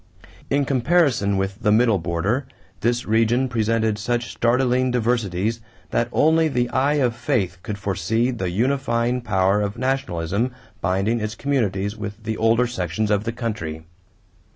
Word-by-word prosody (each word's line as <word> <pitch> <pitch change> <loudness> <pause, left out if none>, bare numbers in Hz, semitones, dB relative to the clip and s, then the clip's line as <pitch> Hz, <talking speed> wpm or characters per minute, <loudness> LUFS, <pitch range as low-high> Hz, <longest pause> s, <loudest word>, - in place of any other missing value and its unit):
In 140 0 +2
comparison 130 - +2
with 95 +3 -3
the 105 - +2
middle 110 -2 +4
border, 90 - -1 0.3
this 120 +3 0
region 115 +4 +2
presented 110 -2 0
such 120 +2 -2
startling 125 +1 +2
diversities 115 -3 0 0.3
that 120 0 +1
only 160 +3 +3
the 125 -4 0
eye 140 +3 +2
of 125 -5 +1
faith 115 - -1
could 105 +2 -5
foresee 100 +5 0
the 95 -7 -3
unifying 120 +3 0
power 95 -2 +2
of 100 +2 -3
nationalism 120 -4 -1 0.3
binding 100 +5 +1
its 110 0 -3
communities 105 -8 -1
with 105 0 -7
the 110 0 -2
older 115 +3 +3
sections 105 -2 -2
of 105 +1 +1
the 115 - -1
country. 95 -10 -4
115 Hz, 145 wpm, -22 LUFS, 100-125 Hz, 0.3 s, middle